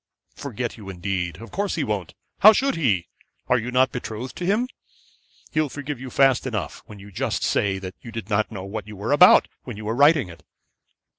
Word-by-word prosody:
'Forget 125 -3 -5
you 100 -3 -10
indeed. 90 -2 -3
Of 115 - -11
course 200 0 -1
he 160 - -1
won't. 105 -8 -3 0.2
How 215 +2 +9
should 275 +5 +1
he? 110 - +1 0.4
Are 125 - +3
you 115 +2 -4
not 130 +1 +3
betrothed 120 0 -6
to 180 - -3
him? 220 +6 +2 0.8
He'll 155 -1 +1
forgive 145 -1 -6
you 130 0 -7
fast 135 0 +3
enough, 110 -6 -4
when 105 - -11
you 100 +1 -13
just - - -2
say 100 -1 +1
that 95 -1 -7
you 115 - -10
did 115 -4 -6
not 110 +1 0
know 95 -4 -6
what 105 +1 -6
you 105 - -9
were 100 +6 -4
about 180 +6 +7 0.2
when 125 -5 -8
you 105 - -8
were 110 - -1
writing 145 - +5
it.' 85 -1 -13
115 Hz, 210 wpm, -23 LUFS, 100-140 Hz, 0.8 s, How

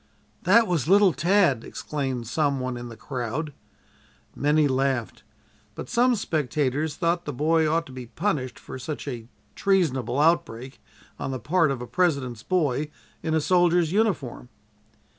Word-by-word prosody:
"That 225 +6 +5
was 165 - -1
little 195 -1 +5
Tad!" 170 - +2
exclaimed 135 -5 -4
some 140 +3 0
one 130 -1 -3
in 120 0 -7
the 115 - -10
crowd. 130 +5 -4 0.8
Many 150 +1 +3
laughed, 130 -3 -1 0.5
but - - -7
some 245 +1 +3
spectators 150 - -1
thought 170 0 0
the 145 - -3
boy 155 +4 +2
ought 165 +1 +1
to - - -12
be 130 -2 -8
punished 130 - -2
for 130 - -9
such 145 +3 -6
a 120 -4 -5 0.3
treasonable 140 - +1
outbreak 135 -5 0 0.4
on - - -3
the 130 - -2
part 160 - +2
of 130 -3 -3
a - - -5
President's 130 -5 0
boy 150 -2 0 0.3
in 160 0 -1
a - - +3
soldier's 175 0 +3
uniform. 180 - -1
150 Hz, 150 wpm, -25 LUFS, 130-170 Hz, 0.8 s, That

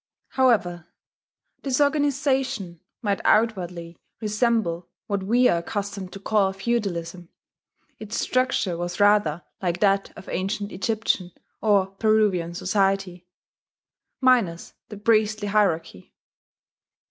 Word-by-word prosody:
However 180 -10 +1 0.7
this 265 -1 -1
organization 275 - 0 0.2
might 200 -2 0
outwardly 180 -6 0 0.2
resemble 210 -5 0 0.2
what 200 -1 -2
we 240 +6 +3
are 170 - +2
accustomed 200 +1 -5
to 195 - -8
call 200 -1 +1
feudalism, 185 -5 -3 0.7
its 215 0 -4
structure 255 -8 0
was 175 +2 -4
rather 205 -6 +3 0.2
like 175 -2 -1
that 195 -1 +2
of - - -11
ancient 200 +2 -3
Egyptian 195 -3 -1 0.3
or 205 -3 +3
Peruvian 195 -4 +1
society, 195 -1 0 0.9
minus 235 -11 +2 0.2
the 210 - -8
priestly 215 -1 +1
hierarchy. 165 - 0
200 Hz, 100 wpm, -24 LUFS, 175-220 Hz, 0.9 s, we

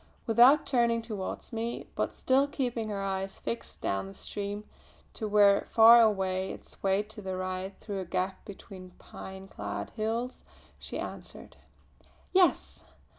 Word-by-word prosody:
Without 245 +6 +6
turning 235 -3 +2
towards 215 0 -6
me, 230 +1 -3
but - - -1
still 270 +2 +2
keeping 245 -6 -2
her 200 -1 -3
eyes 195 0 -3
fixed 230 - -6
down 95 0 -1
the 95 - -11
stream 205 0 -5 0.5
to 220 - -3
where 205 -1 +4
far 230 +1 +8
away 190 -3 +1
it - - -10
swayed 195 +2 -1
to 215 - -9
the 190 -1 -4
right 185 +1 -4
through 200 -3 -5
a 190 - -4
gap 185 +2 -2
between 190 -2 -11
pine 190 0 -10
clad - - -5
hills 230 +3 -3 0.4
she - - -6
answered: - - -8 0.8
"Yes! 370 -2 +2
205 Hz, 145 wpm, -29 LUFS, 190-230 Hz, 0.8 s, far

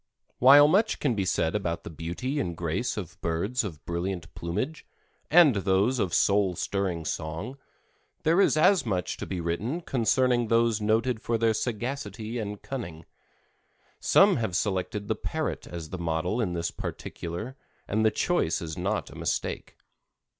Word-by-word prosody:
While 140 +3 +8
much 205 +8 +2
can 140 -5 +1
be 100 -3 -1
said 80 -3 +1
about 85 -5 -2
the - - -8
beauty 90 - -3
and 85 - -3
grace - - -2
of - - -7
birds 100 +10 -1
of 85 -8 -7
brilliant 85 -1 -4
plumage 105 - -3 0.5
and 155 -8 +6
those 100 +6 +2
of 95 -5 0
soul 100 0 +3
stirring 90 -4 -2
song, 85 - -4 0.6
there 165 +5 +4
is 175 - +3
as 185 +5 +5
much 90 -5 -2
to - - -6
be 95 - -3
written 90 - -2
concerning 125 -2 +2
those 115 -1 +2
noted 110 +2 +1
for 115 - 0
their 115 0 +2
sagacity 120 0 -3
and 105 -2 -5
cunning. 85 - -6 0.9
Some - - +5
have 110 -6 -2
selected 100 +1 -1
the 110 - +1
parrot 155 +8 -4
as 85 -3 -7
the 95 - -5
model 85 +7 -1
in 90 -6 -1
this 85 -1 -2
particular 100 +10 -6 0.3
and 110 +2 +1
the 110 - +5
choice 140 - 0
is 80 -2 -5
not 100 +4 -2
a - - -12
mistake. - - -3
105 Hz, 160 wpm, -27 LUFS, 85-125 Hz, 0.9 s, While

